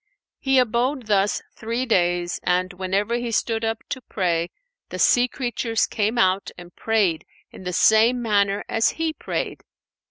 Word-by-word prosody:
He 270 -1 +2
abode 250 +2 +1
thus 205 -1 +1
three 230 +3 -3
days 175 -5 +1
and 180 +1 0
whenever 190 +4 -1
he 240 -1 -3
stood 225 +1 0
up 225 0 -2
to 260 - -4
pray, 175 -6 -1 0.4
the - - -6
sea 245 0 +4
creatures 240 -3 -1
came 215 +3 -1
out 190 -3 +2
and 175 -1 -12
prayed 205 -8 +1 0.3
in 185 - -12
the 180 - -2
same 225 +6 +4
manner 205 -3 +1
as 225 - +2
he 325 -1 -1
prayed. - - -4
220 Hz, 155 wpm, -23 LUFS, 185-240 Hz, 0.4 s, sea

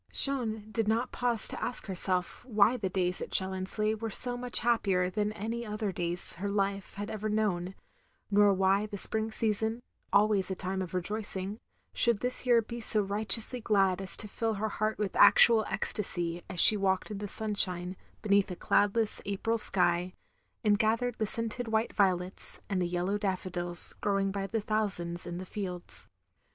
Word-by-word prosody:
Jeanne 225 -6 +3
did 225 -1 -2
not 230 +3 0
pause 240 -3 0
to - - -6
ask 245 - -2
herself 185 -2 +1
why 220 0 +3
the 205 -6 -3
days 180 -1 -2
at - - -5
Challonsleigh 190 +3 -1
were 225 +1 -5
so 245 +4 +2
much 245 0 0
happier 195 -6 +1
than 210 +2 -1
any 225 +3 -5
other 210 -2 -4
days 175 -1 -3
her 200 - -2
life 200 -1 -2
had 205 +1 -6
efver 215 0 -4
known; 195 -4 -1 0.6
nor 205 0 +5
why 195 +2 +1
the 205 -1 -7
spring 220 +2 -1
season, 220 +2 -1 0.3
always 200 -2 +2
a 190 - -3
time 190 +1 -4
of 185 -1 -6
rejoicing, 200 +2 -4 0.3
shotdd 235 -3 +3
this 250 +1 -2
year 235 -2 +4
be 235 +2 -8
so 225 -1 +2
riotously 215 +4 +2
glad 195 -4 +1
as 195 - +4
to 210 - -3
fill 225 +2 -3
her 215 +2 -3
heart 215 +1 -2
with 210 -2 -3
actual 225 -2 +6
ecstacy 175 -4 -2
as 180 -2 -3
she 215 - +10
walked 195 0 -1
in 205 - -5
the 205 - -5
stinshine, 190 -4 +1 0.3
beneath 200 -2 +2
a 180 - -5
cloudless 205 +4 0
April 225 +3 -1
sky, 180 -2 +1 0.5
and 210 -1 +2
gathered 230 +2 0
the 215 - -1
scented 230 +2 -3
white 220 +1 -1
violets, 185 -2 +1
and 190 -2 0
the 175 - 0
yellow 180 +4 -2
daffodils 180 -3 0
growing 195 -1 0
by 195 0 -4
thousands 200 -6 -3
in 175 0 -5
the 185 - -7
fields. 180 - -7
205 Hz, 175 wpm, -29 LUFS, 185-220 Hz, 0.6 s, she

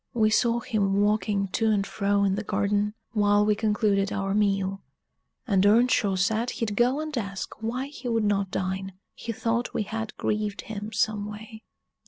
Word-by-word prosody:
We 215 -2 +3
saw 235 +2 +2
him 200 -4 0
walking 205 -1 +1
to 220 +4 +1
and 205 -2 +2
fro 200 0 0
in 195 -1 +2
the 210 +2 -2
garden, 205 +1 0 0.2
while 205 -1 +3
we 210 - +3
concluded 210 -2 +1
our 195 -1 -1
meal; 195 -2 +1 0.6
and 195 -6 +2
Earnshaw 210 -1 +4
said 220 +5 +1
he'd 215 -4 -3
go 245 +5 +2
and 310 -1 -4
ask 200 -2 -5
why 245 +4 -2
he 275 -3 -8
would 230 -2 +1
not 200 -2 +1
dine; 190 +1 -3 0.2
he 230 - -5
thought 230 +2 -2
we - - +1
had 220 +1 -5
grieved 210 -1 -1
him 215 0 -6
some 210 -1 0
way. 220 +1 -10
210 Hz, 175 wpm, -26 LUFS, 200-225 Hz, 0.6 s, Earnshaw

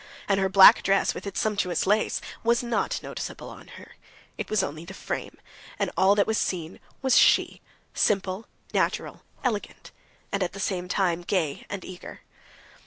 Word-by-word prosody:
And 195 -1 +2
her 190 0 +1
black 190 0 +8
dress, 195 0 +2
with - - -7
its 200 - -4
sumptuous 200 -5 0
lace, 210 +3 +1 0.2
was 235 +1 +2
not 235 -3 -1
noticeable - - -7
on - - -13
her; - - -14 0.4
it - - -6
was 215 -3 +1
only 155 -1 -5
the 190 +3 -10
frame, - - -5 0.4
and - - -1
all 195 +2 +4
that 200 - +3
was 220 -1 0
seen 170 -2 -3 0.2
was 265 -2 +3
she—simple, 195 +1 +1 0.3
natural, - - -1 0.2
elegant, 220 -5 -3 0.4
and 200 - -1
at 180 - -1
the 195 - -8
same 185 -2 -2
time 180 -2 0
gay 175 -5 -2
and 200 -2 -6
eager. 185 -1 -10
195 Hz, 165 wpm, -26 LUFS, 180-210 Hz, 0.4 s, black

